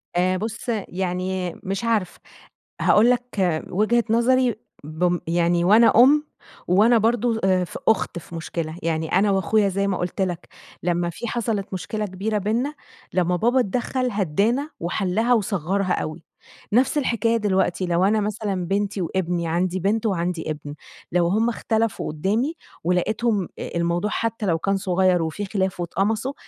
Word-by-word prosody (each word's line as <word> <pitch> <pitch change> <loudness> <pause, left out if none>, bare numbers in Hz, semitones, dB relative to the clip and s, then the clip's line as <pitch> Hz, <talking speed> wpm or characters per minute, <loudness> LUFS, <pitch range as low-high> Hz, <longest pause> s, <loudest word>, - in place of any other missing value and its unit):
آآ 185 +1 +2
بُص، 225 +4 -5 0.2
يعني 185 0 -3
مش 195 +3 -3
عارفة. 220 -6 0 0.6
هاقول 220 +3 +5
لك 210 -10 0
وجهة 215 +5 +2
نظري 240 +1 +3 0.3
بم 175 +3 0
يعني 170 +1 +2
وأنا 215 +6 +6
أم 295 +3 +5 0.4
وأنا 215 +7 +5
برضه 230 +1 +1
أ 185 -1 +3
في 175 - -7
أخت 210 -5 +1
في 170 - -11
مشكلة. 165 -1 -4
يعني 160 -1 -1
أنا 200 +2 +3
وأخويا 195 +2 +2
زي 195 +1 -1
ما 190 -2 0
قُلت 175 +2 -3
لك 180 -2 -2 0.4
لمّا 175 0 0
في 205 +8 -6
حصلت 215 -4 -2
مشكلة 210 +3 -3
كبيرة 205 +3 -2
بيننا، 230 +9 -1 0.4
لمّا 180 -1 +2
بابا 240 +8 +2
اتدخّل 250 +3 -1
هدّانا 210 - 0
وحلها 195 +7 0
وصغّرها 195 -3 0
أوي. 155 +2 -4 0.5
نفس 255 +6 +3
الحكاية 230 -4 +1
دلوقتي، 190 -3 0
لو 175 0 +1
أنا 215 +2 +3
مثلًا 205 -3 -2
بنتي 200 +1 -1
وابني، 175 -1 -1
عندي 180 +3 0
بنت 210 +5 0
وعندي 175 -5 -1
ابن، 145 -1 -7 0.4
لو 175 -1 +2
هم 220 +6 +2
اختلفوا 225 -1 -1
قُدّامي 215 - 0 0.3
ولقيتهم 200 +3 0
أ - - -5
الموضوع 170 +4 0
حتّى 225 -1 -2
لو 170 -4 +2
كان 195 +4 0
صغيّر 185 -2 +2
وفي 165 +6 -3
خلاف 190 -2 -2
واتقمصوا، 215 +9 -1
195 Hz, 150 wpm, -23 LUFS, 175-225 Hz, 0.6 s, وأنا